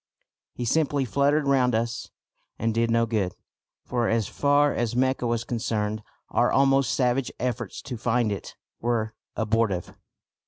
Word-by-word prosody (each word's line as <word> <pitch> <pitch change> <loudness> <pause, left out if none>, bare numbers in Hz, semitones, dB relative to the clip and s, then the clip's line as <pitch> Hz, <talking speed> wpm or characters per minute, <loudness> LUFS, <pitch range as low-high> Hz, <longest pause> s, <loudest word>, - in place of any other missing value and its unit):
He 125 - -3
simply 145 +1 +1
fluttered 140 +4 +2
round 130 -4 +3
us 115 +1 -2 0.5
and 115 0 0
did 115 +1 +1
no 115 0 +3
good, 105 -5 -1 0.5
for 120 -2 0
as 115 -3 +1
far 145 0 +3
as 120 -1 -1
Mecca 130 -1 +1
was 115 0 0
concerned 110 -2 -2 0.3
our - - +3
almost 135 -2 +3
savage 125 0 +1
efforts 125 -3 -3
to 125 -4 -5
find 120 -1 +1
it 100 - -6 0.2
were 115 -2 -1 0.2
abortive. 110 -5 0
120 Hz, 145 wpm, -26 LUFS, 115-130 Hz, 0.5 s, round